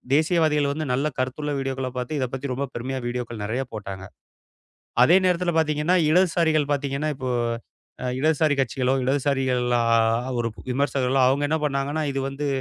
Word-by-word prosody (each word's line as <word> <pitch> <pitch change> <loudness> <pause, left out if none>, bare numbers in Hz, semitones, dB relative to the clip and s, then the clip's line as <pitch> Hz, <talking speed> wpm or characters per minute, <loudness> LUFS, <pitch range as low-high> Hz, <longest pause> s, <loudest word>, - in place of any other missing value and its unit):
தேசியவாதிகள் 155 -2 +2
வந்து 155 +1 -3
நல்ல 135 +4 +1
கருத்து 130 +3 -2
உள்ள 150 - -1
வீடியோக்களைப் 130 -1 -3
பாத்து 125 +5 -3
இதைப் 130 -2 -2
பத்தி 135 +1 -4
ரொம்ப 135 +3 -2
பெருமையா 130 +2 -4
வீடியோக்கள் 120 -2 -4
நெறைய 120 +5 -1
போட்டாங்க. 95 -3 -6 1.0
அதே 170 +8 +6
நேரத்துல 180 -1 +1
பாத்தீங்கன்னா, 155 +3 +2
இடதுசாரிகள் 165 -4 +3
பாத்தீங்கன்னா 140 +2 -2
இப்போ 130 -2 -4 0.7
அ - - -1
இடதுசாரி 155 +1 +2
கட்சிகளோ, 130 0 0
இடதுசாரிகள் 135 -2 +1 0.2
அ - - +1 0.5
ஒரு 115 -1 0 0.2
விமர்சகர்களோ 135 0 +1
அவங்க 135 +3 +2
என்ன 160 - +1
பண்ணாங்கன்னா? 145 +2 -1
இது 135 - -2
வந்து 135 +2 -4
140 Hz, 150 wpm, -24 LUFS, 130-155 Hz, 1.0 s, அதே